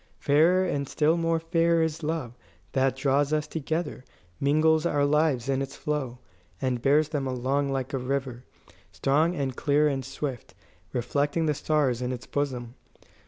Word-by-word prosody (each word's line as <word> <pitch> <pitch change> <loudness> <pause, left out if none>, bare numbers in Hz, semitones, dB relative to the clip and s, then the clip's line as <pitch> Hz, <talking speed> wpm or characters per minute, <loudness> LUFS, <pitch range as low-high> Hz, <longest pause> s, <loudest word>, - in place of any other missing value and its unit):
"Fairer 165 +6 +3
and 140 -6 -2
still 155 +1 +2
more 165 -1 +1
fair 165 0 +2
is 160 0 -2
love, 155 -6 -3 0.4
that 130 -1 +1
draws 140 +1 +1
us 155 -1 +1
together, 160 -2 -3 0.4
mingles 155 +2 +3
our 145 -4 +2
lives 145 -4 +2
in 135 0 0
its 135 0 -5
flow, 140 -5 -3 0.4
and 130 -3 -1
bears 145 +3 +3
them 145 -4 -2
along 135 +2 0
like 135 0 -3
a 135 - 0
river, 130 -1 -3 0.5
strong 155 +6 +1
and 135 -5 -2
clear 150 +2 +2
and 135 -2 -1
swift, 135 -1 -6 0.4
reflecting 145 +6 0
the 150 - +2
stars 140 -5 0
in 125 0 -2
its 125 -1 -6
bosom. 125 -5 -3
145 Hz, 160 wpm, -27 LUFS, 130-155 Hz, 0.5 s, Fairer